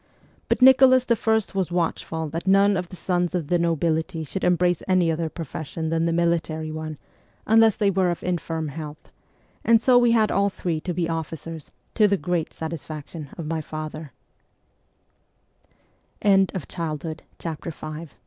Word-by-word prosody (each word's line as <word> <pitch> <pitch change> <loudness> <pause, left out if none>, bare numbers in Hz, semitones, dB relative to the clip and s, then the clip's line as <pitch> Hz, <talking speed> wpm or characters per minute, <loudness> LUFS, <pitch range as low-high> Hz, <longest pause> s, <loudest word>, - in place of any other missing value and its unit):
But - - +2
Nicholas 260 -1 +7
I. 230 -1 +1 0.2
was 190 -3 -1
watchful 165 -2 -2
that 165 +5 -5
none 200 +1 +5
of 180 -2 -3
the - - -9
sons 180 0 -1
of 165 -5 -2
the 175 - +2
nobility 165 0 0
should 190 +5 -5
embrace 180 0 +2
any 185 -3 +3
other 160 0 -2
profession 160 0 -5
than 165 0 +1
the - - +1
military 165 -2 0
one, 155 -1 -5 0.5
unless 225 -1 +5
they 205 -3 +2
were 190 -1 +2
of 175 - -3
infirm 165 -3 -2
health; 150 +1 -9 0.5
and 230 0 +5
so 245 +1 +5
we 240 -1 +4
had 220 -2 +3
all 200 0 +2
three 175 -4 -3
to 180 - -3
be 175 -2 0
officers, 165 -1 -5 0.2
to 215 -2 +4
the 200 0 +2
great 175 -3 -2
satisfaction 155 -1 -7
170 Hz, 135 wpm, -24 LUFS, 160-195 Hz, 0.5 s, Nicholas